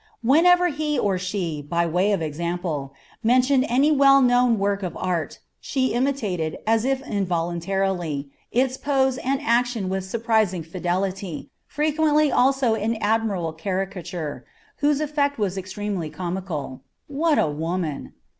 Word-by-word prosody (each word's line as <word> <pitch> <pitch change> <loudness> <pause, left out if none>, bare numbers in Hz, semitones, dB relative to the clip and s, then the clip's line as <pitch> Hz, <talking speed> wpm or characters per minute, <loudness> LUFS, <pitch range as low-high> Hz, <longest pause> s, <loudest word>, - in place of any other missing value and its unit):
Whenever 355 +8 +5
he 300 -1 -1
or 195 -6 +1
she, 180 -5 -3
by 170 +4 0
way 180 +5 +1
of 195 -5 0
example, 160 -2 -3 0.3
mentioned 255 +3 +3
any 275 +5 +3
well 275 -1 +6
known 245 -2 +4
work 200 0 0
of 180 -3 -4
art, 175 -3 -2 0.2
she 260 -3 -1
imitated, 215 - -1
as 225 +1 +2
if 270 0 -1
involuntarily, 175 -4 -1 0.2
its 255 +1 +1
pose 265 -2 +1
and 270 +1 -1
action 240 -6 +1
with 190 0 -2
surprising 215 -3 0
fidelity, 185 +1 -3 0.2
frequently 300 0 +2
also 260 -2 +3
in 220 +1 -1
admirable 210 -6 0
caricature, 180 -2 -4 0.3
whose 290 -1 +2
effect 285 -1 0
was 200 -4 -1
extremely 190 -2 -4
comical. 175 -7 -5 0.2
What 300 +2 +1
a - - +4
woman! 160 0 -3
200 Hz, 130 wpm, -23 LUFS, 175-265 Hz, 0.3 s, well